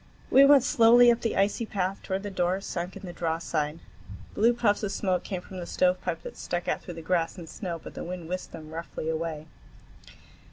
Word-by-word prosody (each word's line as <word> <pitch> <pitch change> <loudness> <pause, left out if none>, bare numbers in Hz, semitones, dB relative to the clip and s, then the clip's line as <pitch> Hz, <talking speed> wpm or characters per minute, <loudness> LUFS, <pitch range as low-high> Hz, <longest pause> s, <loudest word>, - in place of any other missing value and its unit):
We 275 +1 +8
went 280 -2 +7
slowly 240 0 +6
up 235 - 0
the 225 - -1
icy 200 +4 +2
path 195 -3 -2
toward 190 0 -3
the 205 - -5
door 180 0 0
sunk 180 -2 -5
in - - -12
the 175 - -7
drawside. 160 -2 -2 0.6
Blue 230 +3 +4
puffs 230 -4 +1
of 205 -2 -2
smoke 185 -3 0
came 185 -3 -4
from 185 0 -9
the 175 - -6
stovepipe 180 -2 0
that - - -8
stuck 175 0 -3
out - - 0
through 175 - -8
the 165 - -8
grass 170 0 0
and 170 -2 -8
snow, 175 -1 -5
but - - -11
the - - -6
wind 175 -1 -6
whisked 185 +2 -4
them 155 -1 -10
roughly 160 -1 -5
away. 160 -1 -3
180 Hz, 210 wpm, -27 LUFS, 165-205 Hz, 0.6 s, We